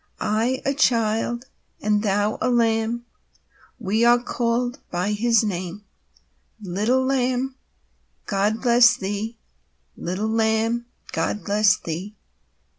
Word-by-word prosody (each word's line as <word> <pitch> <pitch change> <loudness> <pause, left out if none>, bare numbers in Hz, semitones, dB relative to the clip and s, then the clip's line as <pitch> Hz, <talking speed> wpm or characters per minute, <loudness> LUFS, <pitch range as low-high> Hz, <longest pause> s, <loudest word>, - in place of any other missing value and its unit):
I 230 +5 0
a 275 - +2
child, 235 -2 +1 0.3
and 210 0 +1
thou 205 0 0
a 255 - +1
lamb, 230 0 +1 0.7
We 215 +4 0
are 240 +1 +6
called 245 +1 -1
by 180 +3 -1
His 230 +2 +3
name. 185 0 -4 0.8
Little 215 +7 0
Lamb, 260 0 0 0.7
God 210 +3 0
bless 240 0 +6
thee! 205 +3 -4 0.6
Little 185 +5 -3
Lamb, 225 +1 +1 0.2
God 210 - -2
bless 205 -1 +3
thee! 180 +6 -6
225 Hz, 110 wpm, -23 LUFS, 205-240 Hz, 0.8 s, are